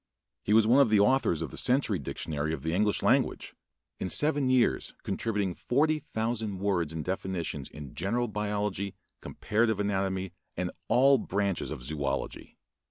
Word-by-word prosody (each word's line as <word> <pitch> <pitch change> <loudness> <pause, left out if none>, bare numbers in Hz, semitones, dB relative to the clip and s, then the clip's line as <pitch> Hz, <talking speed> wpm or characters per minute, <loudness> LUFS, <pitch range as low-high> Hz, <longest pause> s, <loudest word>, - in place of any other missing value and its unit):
He - - -3
was 110 0 +6
one 120 +5 +5
of 135 - +4
the 105 -1 +4
authors 105 - +3
of 75 - -6
the - - -6
Century 125 -7 +1
Dictionary 75 +1 -3
of 70 - -12
the 80 0 -1
English 105 +2 +1
Language, - - +1 0.5
in 95 - -3
seven 145 0 +2
years 125 - +2
contributing 105 -5 -1
40,000 120 - -1
words 90 -5 0
and 80 -2 -5
definitions 90 -7 -3
in 75 -3 -10
general 115 +8 -1
biology, 105 -2 -2 0.3
comparative 110 0 0
anatomy, 95 -2 -1 0.2
and 90 0 -2 0.2
all 135 +1 +5
branches 100 -3 -1
of - - -5
zoölogy. 70 0 -3
100 Hz, 150 wpm, -29 LUFS, 90-115 Hz, 0.5 s, was